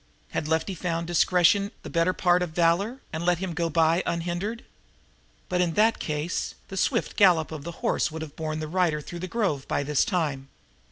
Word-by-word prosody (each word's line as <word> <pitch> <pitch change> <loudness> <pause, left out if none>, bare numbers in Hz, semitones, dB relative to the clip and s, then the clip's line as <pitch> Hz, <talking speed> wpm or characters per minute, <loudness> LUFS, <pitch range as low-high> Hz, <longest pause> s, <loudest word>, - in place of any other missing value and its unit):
Had 150 - -2
Lefty 160 +5 0
found 170 -1 -2
discretion 180 +3 +3
the - - -7
better 170 +1 +2
part 180 -1 +2
of 180 - -1
valor 190 +10 +2
and 160 +2 -3
let 175 0 +3
him 180 -1 -4
go 165 +1 -1
by 165 +2 +3
unhindered? 175 +7 -2 0.8
But, 180 0 0
in 170 -2 +1
that 220 +2 +3
case, 155 +2 -3
the 195 - -6
swift - - 0
gallop 175 -6 +4
of 155 -3 -6
the 170 - -5
horse - - +2
would 160 +1 -6
have 155 -2 -10
borne 155 -1 -3
the 155 - -3
rider 170 -2 +1
through 170 +3 -8
the 185 - -4
grove 185 - -1
by 145 - 0
this 145 0 +2
time. 145 -7 -2
170 Hz, 200 wpm, -26 LUFS, 160-180 Hz, 0.8 s, gallop